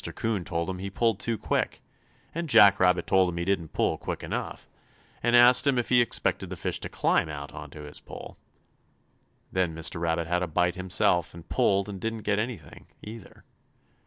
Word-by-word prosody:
'Coon 110 -5 -1
told 85 -1 -3
him 95 -1 -4
he 100 +1 -5
pulled 115 +1 0
too 115 -2 -2
quick, - - -2 0.5
and 170 0 -4
Jack 100 -5 +7
Rabbit 90 -1 +3
told 95 -1 +3
him 85 - -5
he 85 - -2
didn't 90 -5 -1
pull - - 0
quick - - -5
enough, - - -5 0.5
and 120 +1 +2
asked 120 +3 +6
him 135 -2 +3
if 120 - -1
he 125 -1 +5
expected 120 - -1
the - - -5
fish - - -3
to - - -6
climb 80 - +1
out 70 -1 -7
on 75 -1 -8
his 75 0 -10
pole. - - -10 1.2
Then 90 -3 0
Mr. 80 +1 -2
Rabbit 85 0 0
had 90 +2 0
a 90 - -1
bite 90 +2 +1
himself, 90 -2 +1
and 85 - -12
pulled 100 0 +1
and 100 -3 -7
didn't 115 -1 -4
get 105 0 0
anything, 110 - -6 0.2
either. 110 0 -11
95 Hz, 190 wpm, -27 LUFS, 85-110 Hz, 1.2 s, Jack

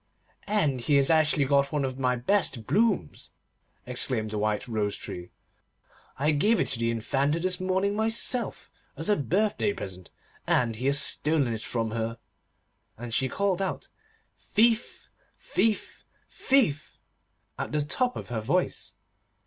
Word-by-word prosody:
'And 150 - +1
he 145 +5 +2
has 140 +2 +4
actually 155 -3 +3
got 140 0 +2
one 145 -3 0
of 130 0 -5
my 125 -1 +1
best 130 - 0
blooms,' 210 - 0 0.6
exclaimed 125 -3 0
the 105 - -2
White 105 +3 -1
Rose 105 -3 -1
Tree. 90 0 -7 0.9
'I 150 +4 +2
gave 210 +10 +3
it - - +1
to 115 - -2
the 115 0 +1
Infanta 135 +7 0
this 185 +1 +1
morning 190 +2 0
myself, 225 +3 0 0.3
as - - -2
a 210 - +5
birthday 205 +6 0
present, 95 - -7 0.4
and 115 -3 +1
he 125 +4 -2
has 140 +1 +5
stolen 145 -4 +1
it 110 - -5
from 115 -2 -2
her.' 115 +1 -3 0.8
And 120 0 -7
she 130 +2 +1
called 195 +1 0
out: 190 - -3 0.5
'Thief, 230 +1 +1 0.3
thief, 220 -2 -1 0.3
thief!' 205 - +1 0.6
at - - -3
the 150 0 0
top 250 - 0
of - - -7
her 115 -2 -2
voice. 175 +11 -1
140 Hz, 150 wpm, -27 LUFS, 115-195 Hz, 0.9 s, a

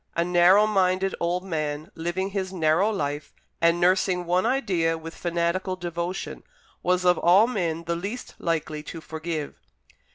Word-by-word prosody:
A 170 - +1
narrow 180 +4 +5
minded 190 -2 +1
old 175 +2 -1
man, 155 -1 -3
living 175 +4 -3
his 190 -2 -3
narrow 170 +3 +2
life, 145 -7 -3 0.3
and 170 +1 +4
nursing 180 0 +2
one 180 +5 +2
idea 180 -11 +1
with 165 +1 -8
fanatical 175 +2 -1
devotion, 175 +1 -4 0.4
was 180 0 +1
of 180 -1 +4
all 185 +6 +6
men 170 -9 -2
the 170 0 -2
least 200 +8 -6
likely 155 -2 -2
to 165 +2 -8
forgive. 160 -1 -5
175 Hz, 150 wpm, -25 LUFS, 165-190 Hz, 0.4 s, all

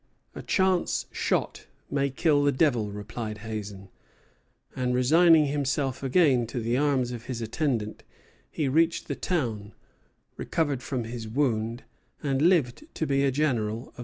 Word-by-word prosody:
"A - - -7
chance 190 -2 +1
shot - - -2 0.2
may 140 0 +1
kill 145 +1 +2
the 145 - +3
devil," 125 -7 +1
replied 105 +1 -6
Hazen; 100 -3 -6 0.9
and 125 -1 0
resigning 160 +5 +5
himself 140 -2 -1
again 135 -4 +3
to 120 +2 -4
the 115 +1 -1
arms 135 -3 +1
of 120 -2 -7
his 125 -2 -4
attendant, 115 -2 -2 0.5
he 150 - -2
reached 165 +5 +1
the - - -2
town, 115 - -2 0.6
recovered 145 -6 -1
from 130 -3 -3
his 115 0 -6
wound, 115 -2 -1 0.4
and 135 -2 0
lived 170 - +2
to 160 - -1
be 140 -1 +1
a 140 - +3
general 130 -6 0
of 110 - -4
the - - -6
Revolution. - - -20
130 Hz, 155 wpm, -27 LUFS, 115-150 Hz, 0.9 s, resigning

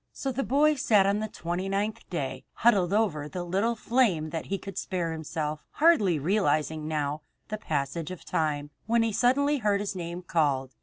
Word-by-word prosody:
So 270 - -3
the 260 +2 -2
boy 295 +4 +4
sat 215 -8 +3
on 200 +1 +2
the 215 - -2
twenty 180 -1 -4
ninth 205 +2 -2
day, 140 -7 -3
huddled 200 -6 +3
over 180 -9 +1
the 180 +1 -4
little 195 +7 0
flame 215 -10 +1
that 165 - -4
he 195 - -1
could 195 0 -6
spare 175 -3 -2
himself, 155 -1 -4
hardly 290 - +4
realizing 155 -2 0
now 150 -1 -2 0.3
the 215 -1 -3
passage 150 -1 -2
of 185 -2 -8
time, 145 -2 -1 0.2
when 230 0 +3
he 225 -1 0
suddenly 280 +6 +3
heard 205 -3 +2
his 200 -1 -3
name 175 0 -5
called. 140 -6 0
185 Hz, 185 wpm, -28 LUFS, 155-215 Hz, 0.3 s, boy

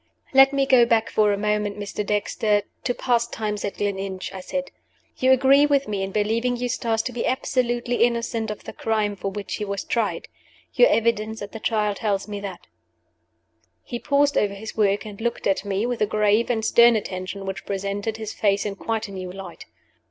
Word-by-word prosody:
"Let 270 0 +7
me 275 -1 +1
go 260 -3 +6
back 225 -1 +2
for 210 -1 +3
a 200 - 0
moment, 210 0 -1
Mr. 205 0 -4
Dexter, 210 0 0 0.2
to 245 - 0
past 235 -1 0
times 210 -2 -3
at 200 - -3
Gleninch," 195 -2 -3
I 190 - -6
said. 275 +8 -4 0.5
"You 260 0 +4
agree 270 +2 +5
with 280 -1 +2
me 205 -2 -2
in 195 - -2
believing 230 +4 0
Eustace 235 -2 -1
to 255 - -3
be 245 -1 -2
absolutely 245 -2 0
innocent 235 -1 0
of 210 - -6
the - - -8
crime 215 -2 -1
for 195 - -3
which 200 0 -5
he 210 - -3
was 200 -1 -3
tried. 230 -3 -1 0.5
Your - - +6
evidence 220 -1 0
at 200 - -8
the 225 - -7
Trial 210 -2 0
tells 200 -1 -2
me 205 -1 -5
that." 195 -3 -7 1.2
He 240 - -5
paused 285 +1 +2
over 200 -1 0
his 220 +2 -8
work, 205 -1 +1
and 210 0 -9
looked 235 +1 -2
at 195 -1 +1
me 200 +1 -1
with 245 -1 -3
a 210 - +3
grave 215 +2 +2
and 220 -3 0
stern 235 +1 +6
attention 195 -1 -4
which 195 0 -6
presented 200 +2 -3
his 220 -1 -5
face 200 -1 +1
in 200 -1 -3
quite 225 0 -2
a - - -10
new 185 -2 -6
light. 190 -2 -9
215 Hz, 200 wpm, -23 LUFS, 200-235 Hz, 1.2 s, Let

